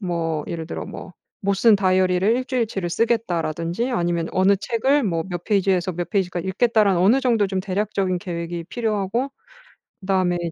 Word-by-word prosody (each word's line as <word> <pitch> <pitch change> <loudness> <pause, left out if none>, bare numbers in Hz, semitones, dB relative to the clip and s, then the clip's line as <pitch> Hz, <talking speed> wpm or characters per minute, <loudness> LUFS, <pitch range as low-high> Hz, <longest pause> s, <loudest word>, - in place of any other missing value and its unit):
뭐 165 -5 -2
예를 165 -2 -5
들어 - - -5
뭐 185 - -9 0.3
'못 200 0 +1
쓴 220 +2 +5
다이어리를 185 -1 +2
1 255 - -2
주일 250 -4 0
치를 195 -5 -4
쓰겠다.'라든지 175 -1 -1
아니면 170 -7 -1
'어느 190 +2 +4
책을 260 +7 +1
뭐 165 -4 0
몇 175 -2 -5
페이지에서 190 -3 +1
몇 175 +1 -4
페이지까지 180 -3 -1
읽겠다.'라는 205 -2 +3
어느 225 +9 +4
정도 230 -6 +2
좀 190 -1 -2
대략적인 195 -1 -1
계획이 170 -2 -5
필요하고 225 +4 -2 0.7
그다음에 185 -2 +1
190 Hz, 390 characters per minute, -22 LUFS, 175-215 Hz, 0.7 s, 쓴